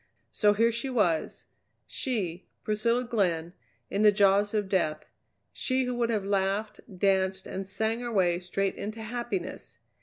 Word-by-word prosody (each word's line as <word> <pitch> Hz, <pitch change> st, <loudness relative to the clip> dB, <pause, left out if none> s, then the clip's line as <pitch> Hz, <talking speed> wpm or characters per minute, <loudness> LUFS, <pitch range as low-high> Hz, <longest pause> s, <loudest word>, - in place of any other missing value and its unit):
So 205 Hz, -1 st, +3 dB
here 230 Hz, +2 st, +3 dB
she 235 Hz, +4 st, -2 dB
was 180 Hz, -11 st, 0 dB, 0.4 s
she, 190 Hz, -9 st, -3 dB, 0.2 s
Priscilla 230 Hz, +3 st, +1 dB
Glenn, 180 Hz, -8 st, 0 dB, 0.4 s
in 200 Hz, -, 0 dB
the 210 Hz, -1 st, +7 dB
jaws 200 Hz, 0 st, +3 dB
of 205 Hz, -2 st, 0 dB
death, 155 Hz, -6 st, 0 dB, 0.5 s
she 260 Hz, 0 st, 0 dB
who 250 Hz, 0 st, -2 dB
would 240 Hz, -1 st, 0 dB
have 215 Hz, -4 st, 0 dB
laughed, 200 Hz, +2 st, 0 dB, 0.2 s
danced, 190 Hz, 0 st, +1 dB
and 190 Hz, 0 st, -5 dB
sang 220 Hz, +4 st, -1 dB
her 240 Hz, -1 st, -4 dB
way 175 Hz, -5 st, +2 dB
straight 190 Hz, +2 st, -1 dB
into 215 Hz, +2 st, -5 dB
happiness! 225 Hz, -5 st, -4 dB
205 Hz, 150 wpm, -28 LUFS, 190-230 Hz, 0.5 s, the